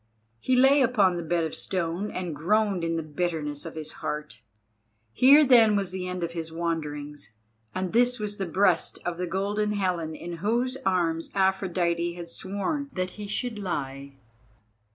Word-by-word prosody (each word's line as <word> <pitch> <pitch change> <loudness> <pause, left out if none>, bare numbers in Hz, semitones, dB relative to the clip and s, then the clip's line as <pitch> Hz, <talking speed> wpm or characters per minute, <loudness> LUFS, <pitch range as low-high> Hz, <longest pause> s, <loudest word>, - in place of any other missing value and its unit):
He 255 - +1
lay 270 +3 +6
upon 210 -8 +3
the 175 - -3
bed 170 +1 0
of 160 - -3
stone 180 +2 -2
and 180 -4 -4
groaned 195 +3 +1
in 165 0 0
the 165 - -2
bitterness 155 -1 -3
of 160 - -9
his 155 -1 -6
heart. 150 -7 -4 0.7
Here 280 - +7
then 230 -5 +6
was 195 -3 -1
the 185 -1 -4
end 180 -1 -3
of 170 - -2
his 165 -1 -5
wanderings, 150 -6 -4 0.4
and 185 -1 -2
this 245 +2 +4
was 210 -2 -4
the 195 - -2
breast 180 0 +2
of 175 -1 -3
the 180 - -1
Golden 205 +4 -1
Helen 180 -5 -1
in 170 +1 -6
whose 235 +7 0
arms 165 -3 +1
Aphrodite 180 -3 +1
had 170 -1 -8
sworn 205 - -3
that 185 -1 -2
he 210 -1 -7
should 225 +1 -3
lie. 140 -7 -4
180 Hz, 170 wpm, -27 LUFS, 165-205 Hz, 0.7 s, Here